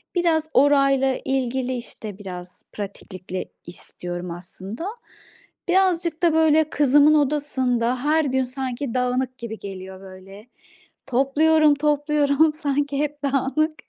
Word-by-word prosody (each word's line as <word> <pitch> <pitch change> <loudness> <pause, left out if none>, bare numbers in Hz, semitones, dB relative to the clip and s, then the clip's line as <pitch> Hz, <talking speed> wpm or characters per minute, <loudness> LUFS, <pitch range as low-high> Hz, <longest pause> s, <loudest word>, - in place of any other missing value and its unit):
Biraz 320 -3 +1
orayla 275 -1 +3
ilgili, 260 -1 -1
işte, 215 -4 -9
biraz, 180 -2 -9
pratiklikle 185 -2 -6 0.2
istiyorum 175 0 -7
aslında. 190 - -8 0.8
Birazcık 350 -3 +1
da 335 - +4
böyle 315 -1 +4
kızımın 290 +1 +4
odasında 260 -4 0
her 310 +1 +2
gün 265 -1 0
sanki 255 -1 -4
dağınık 255 0 -1
gibi 225 -2 -6
geliyor 190 -1 -8
böyle. 195 +3 -13 0.6
Topluyorum, 295 +4 +3
topluyorum, 295 +1 +2
sanki 285 -2 -1
hep 295 -1 -3
dağınık. 280 +3 0
270 Hz, 110 wpm, -23 LUFS, 230-300 Hz, 0.8 s, da